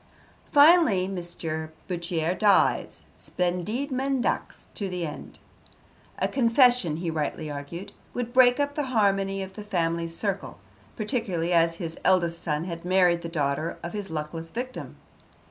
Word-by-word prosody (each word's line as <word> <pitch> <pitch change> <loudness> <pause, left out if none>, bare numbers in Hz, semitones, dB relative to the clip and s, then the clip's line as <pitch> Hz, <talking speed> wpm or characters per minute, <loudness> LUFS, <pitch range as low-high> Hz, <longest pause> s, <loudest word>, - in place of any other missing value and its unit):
Finally, 290 - +6
Mr. 170 -4 -5 0.2
Bourchier 170 -2 -1
dies, 205 +1 +2
splendide 185 - -2
mendax 265 -1 -1
to 200 -2 -4
the 180 -2 -3
end. 150 - -8 0.8
A - - +1
confession, 245 - +4
he 170 0 -2
rightly 155 0 -3
argued, 170 +8 -7 0.2
would 245 -1 -3
break 250 0 +6
up 285 0 0
the 290 -2 -2
harmony 195 -1 +2
of 190 0 -9
the 210 - -8
family 170 -4 -1
circle, 195 +4 -4 0.4
particularly 205 -7 -1
as 165 0 +3
his 165 -2 -6
eldest 170 -3 +2
son 150 0 -1
had 170 -1 -6
married 180 -1 +3
the 170 - -5
daughter 155 0 -1
of 170 - -5
his 205 -2 -4
luckless 160 +1 -5
victim. 250 +6 -6
180 Hz, 140 wpm, -26 LUFS, 165-225 Hz, 0.8 s, Finally